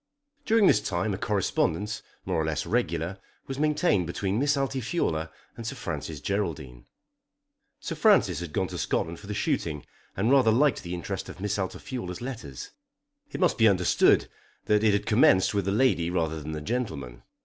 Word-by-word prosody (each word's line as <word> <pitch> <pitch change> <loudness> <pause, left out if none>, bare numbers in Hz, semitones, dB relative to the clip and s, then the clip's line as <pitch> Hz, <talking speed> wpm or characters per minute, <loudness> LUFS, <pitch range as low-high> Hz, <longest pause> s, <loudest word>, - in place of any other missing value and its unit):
During 225 -2 +4
this - - +5
time 95 +3 -1
a - - -3
correspondence, 105 0 0 0.2
more - - 0
or - - -1
less 75 -2 -2
regular, 95 -5 -1 0.3
was 135 0 -5
maintained 150 - +2
between 95 +4 -1
Miss 145 +1 +2
Altifiorla 130 - -1 0.3
and 115 - -7
Sir - - -4
Francis 75 -2 -5
Geraldine. 75 -10 -3 0.9
Sir - - -5
Francis 190 - +4
had 85 -3 -6
gone - - 0
to - - -5
Scotland 85 +1 -1
for 100 - -12
the 105 - -4
shooting, 75 -7 -1 0.3
and 110 +6 +2
rather 135 -5 +5
liked 130 +4 +3
the 90 0 -5
interest 95 +2 -5
of - - -10
Miss 105 +1 -2
Altifiorla's 95 -1 -5
letters. 110 - -7 0.6
It - - -5
must 180 -8 +2
be 115 - +7
understood 90 -4 +4 0.4
that 105 0 +2
it 105 -2 +4
had 100 - 0
commenced 105 -4 +4
with 100 -3 0
the 95 - 0
lady 105 -7 +2
rather 80 -3 -1
than 75 +2 -6
the 75 - -4
gentleman. 80 - -4
100 Hz, 175 wpm, -27 LUFS, 80-120 Hz, 0.9 s, be